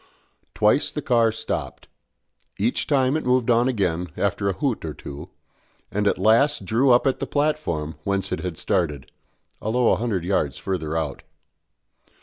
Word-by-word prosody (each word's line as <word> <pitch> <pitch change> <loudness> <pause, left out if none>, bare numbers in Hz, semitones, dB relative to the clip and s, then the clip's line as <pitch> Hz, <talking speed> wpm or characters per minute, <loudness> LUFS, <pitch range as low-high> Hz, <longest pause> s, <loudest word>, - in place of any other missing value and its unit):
Twice 105 +8 +3
the 150 - -5
car 115 -3 +3
stopped; 110 - -4 0.7
each 115 +5 0
time 135 -1 +2
it 155 - -1
moved 125 -1 +2
on 120 +2 +3
again 90 -8 -1
after 100 0 0
a - - 0
hoot 135 -2 -2
or 80 -2 -5
two, 70 0 -9 0.6
and 105 0 0
at - - +2
last 115 +4 +3
drew 120 +8 +2
up 120 +2 +5
at 135 - +1
the - - -3
platform 145 - -1
whence 100 -1 -1
it - - -1
had 85 -1 -5
started, 75 -6 -1 0.5
although 120 +3 +2
a - - +3
hundred 110 -7 -1
yards 80 -7 0
further 80 -4 -3
out. 75 -4 -3
105 Hz, 160 wpm, -23 LUFS, 90-125 Hz, 0.7 s, up